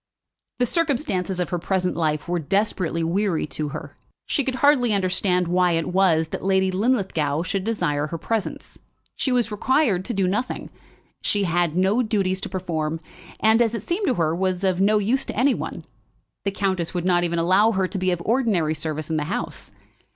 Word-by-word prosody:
The 245 - +2
circumstances 240 - -1
of 180 - -1
her 175 - -1
present 180 +1 -1
life 155 -2 -1
were 175 0 0
desperately 180 -1 0
weary 180 0 0
to 150 0 -4
her. 145 -1 -8 0.3
She 285 - 0
could 260 0 -2
hardly 260 -6 +4
understand 185 -1 +1
why 180 0 +2
it 165 +1 0
was 165 -4 +3
that - - -5
Lady 190 0 +2
Linlithgow 185 - 0
should 190 +1 -2
desire 170 -9 -1
her 165 - -4
presence. 220 +4 -4 0.4
She 265 - -1
was 245 -3 +1
required 215 - +2
to 240 - -3
do 195 -1 +2
nothing. 210 +8 -2 0.5
She 205 -1 +1
had 175 -2 +1
no 195 +6 +3
duties 195 -5 0
to - - -4
perform, 165 -4 -2 0.4
and, 220 +2 +4
as 230 -1 +2
it 220 - -5
seemed 365 - -1
to 255 - +2
her, 160 -2 +1
was 185 +1 -1
of 185 -1 +1
no 210 +2 +4
use 225 +6 +1
to - - -6
any 260 +3 +4
one. - - -5 0.6
The 200 - +1
countess 190 -4 -2
would 175 0 -1
not 175 -1 +3
even 170 -1 -1
allow 190 +7 +4
her 190 -1 +1
to 195 - -5
be 185 0 +1
of 175 -1 -1
ordinary 215 -10 +1
service 155 0 -4
in 160 - +1
the 150 - -1
house. 180 - -4
185 Hz, 195 wpm, -23 LUFS, 170-215 Hz, 0.6 s, hardly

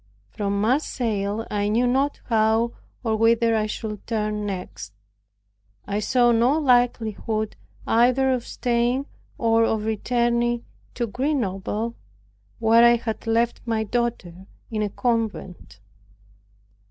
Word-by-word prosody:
From 200 -1 -2
Marseilles 225 -3 -1
I 205 0 0
knew 235 +4 +2
not 270 +3 0
how 225 0 +2 0.3
or 220 -2 +1
whither 230 +1 +3
I 215 -1 +1
should 210 -1 -6
turn 210 -2 -2
next. 180 - -6 0.9
I 205 +1 -2
saw 240 +3 +3
no 240 +6 +3
likelihood 230 -5 +1 0.3
either 255 +3 +3
of 250 -2 0
staying 245 +2 0 0.3
or 230 -1 +3
of 220 -1 0
returning 235 +2 0 0.3
to 240 - -1
Grenoble, 230 -3 -2 0.6
where 230 +1 +5
I 235 0 +7
had 225 -1 -5
left 230 +1 +1
my 225 -1 0
daughter 205 -6 -3 0.2
in 215 -1 -1
a 210 - 0
convent. 215 - -3
225 Hz, 115 wpm, -23 LUFS, 215-240 Hz, 0.9 s, I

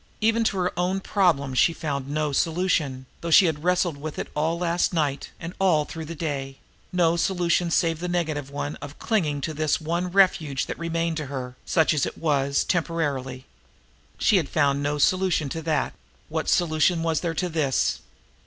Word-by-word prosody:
Even 225 +1 +2
to 200 - +1
her 180 0 0
own 185 +2 +1
problem 170 -10 +1
she 165 +6 +4
had - - -17
found 140 -3 -3
no 150 0 -1
solution, 155 -4 0 0.2
though 170 - -4
she 185 +4 +7
had 155 -3 -1
wrestled 180 -3 +1
with 150 +1 -6
it - - -4
all 160 +3 0
last 175 +1 0
night, 145 -4 -1
and 170 +1 -6
all 170 -6 +3
through 160 0 -7
the 165 +2 -7
day; 140 -4 -4 0.3
no 170 -2 +3
solution 175 -1 +1
save 165 -1 +1
the 180 - -3
negative 155 -5 -2
one 145 +1 -4
of 145 0 -9
clinging 155 -11 0
to 155 - -3
this 155 0 0
one 170 +3 -2
refuge 170 -8 +3
that - - -6
remained 165 -1 -1
to 150 -3 -4
her, 130 -2 -5
such 160 -2 +3
as 150 - +1
it - - -7
was, 140 -3 +1
temporarily. 145 -7 -2 0.7
She 205 - +4
had 160 -6 -1
found 140 -2 +2
no 145 +1 -1
solution 180 -2 +2
to 160 - -4
that; 160 -1 0 0.4
what - - -2
solution 165 0 +2
was 160 -2 +1
there 165 -2 -2
to 180 - 0
this! 155 -6 0
160 Hz, 190 wpm, -25 LUFS, 145-175 Hz, 0.7 s, she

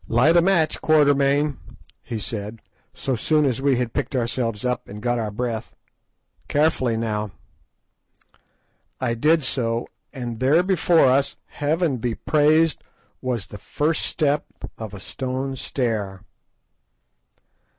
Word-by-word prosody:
"Light 125 +9 +4
a 170 - +7
match, 170 -4 +2
Quatermain," 145 -1 +3 0.4
he 115 - -5
said, 105 0 -5 0.3
so 130 - -2
soon 150 +6 +2
as 130 -2 0
we 140 -1 +3
had 120 -2 -2
picked - - -2
ourselves 115 -2 -1
up 125 0 -1
and 105 - -8
got 120 +2 0
our 110 -2 -2
breath; 115 +1 -4 0.7
"carefully, 145 -6 +2
now." 105 -2 -2 1.7
I 115 - 0
did 150 +6 +3
so, 120 -3 -1 0.3
and 120 -4 -5
there 145 +7 +4
before 175 -4 +4
us, 135 +2 +2
Heaven 150 -1 0
be 115 -1 -2
praised! 155 +1 +2 0.4
was 125 -7 -2
the 105 - -10
_first 155 +9 -1
step 150 -2 +1 0.3
of 110 -2 -7
a - - -8
stone 130 +6 -4
stair. 110 -8 -2
130 Hz, 130 wpm, -23 LUFS, 115-150 Hz, 1.7 s, a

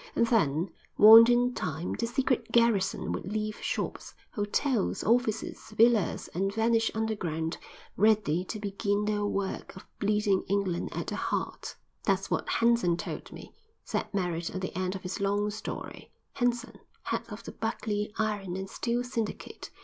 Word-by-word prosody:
And 235 - +4
then, 175 - +1 0.3
warned 225 +2 +10
in 245 +1 +3
time, 160 -2 -3
the 230 - -2
secret 245 -2 0
garrison 230 -5 +2
would 190 - -4
leave 215 0 -3
shops, - - -3 0.2
hotels, 210 +2 0
offices, 225 -1 +1 0.2
villas, 230 -3 +3
and 195 +3 0
vanish 225 +1 +2
underground, 180 -8 -2 0.4
ready 205 -5 +3
to 215 - -5
begin 205 0 -1
their 210 0 0
work 200 -1 -3
of 185 - -11
bleeding 210 -1 +2
England 195 -3 0
at - - -3
the - - -4
heart. - - -3 0.3
"That's - - 0
what - - -1
Henson 230 -8 +3
told - - -6
me," - - -11 0.3
said - - -3
Merritt 175 -4 -1
at 185 - -5
the 185 - -4
end 185 +1 -1
of 190 - -7
his 180 0 -4
long 205 +1 +1
story. 215 +1 -7 0.2
"Henson, 245 -2 -1 0.2
head - - -1
of 210 +2 -8
the - - -7
Buckley 215 -2 -2
Iron 205 -4 -1
and 190 0 -4
Steel 235 +5 -1
Syndicate. 235 -4 -5
210 Hz, 155 wpm, -29 LUFS, 190-230 Hz, 0.4 s, warned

